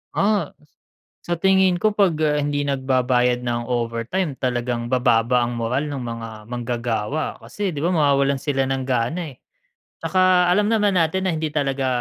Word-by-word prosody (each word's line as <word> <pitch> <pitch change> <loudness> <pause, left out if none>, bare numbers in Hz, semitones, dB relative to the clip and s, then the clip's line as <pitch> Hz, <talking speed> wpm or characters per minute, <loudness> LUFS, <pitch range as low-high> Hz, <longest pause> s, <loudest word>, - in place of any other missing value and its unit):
Ah. 205 0 +1
S 150 -2 -28 0.5
sa 175 -1 -3
tingin 190 -2 +3
ko 215 - +3
pag, 200 -4 +2
ah, 150 -1 +2
hindi 145 -1 -1
nagbabayad 130 -2 +1
ng 120 -1 -2
overtime 120 +7 -2
talagang 120 -1 -2
bababa 125 -1 +3
ang 120 0 -2
moral 125 +6 -1
ng 140 -3 -4
mga 115 -1 -5 0.2
manggagawa. 120 +3 -3
Kasi 205 -3 -4
di 145 - -5
ba 170 - +1
mawawalan 140 -5 +2
sila 135 -1 -1
ng 135 -1 -2
gana, 135 +6 -1
eh. 125 - -23 0.6
'Tsaka 185 -1 +3
alam 205 +4 +2
naman 210 -3 +2
natin 180 +2 +1
na 175 - 0
hindi 155 -1 -2
talaga 135 -3 -1
140 Hz, 165 wpm, -22 LUFS, 125-175 Hz, 0.6 s, tingin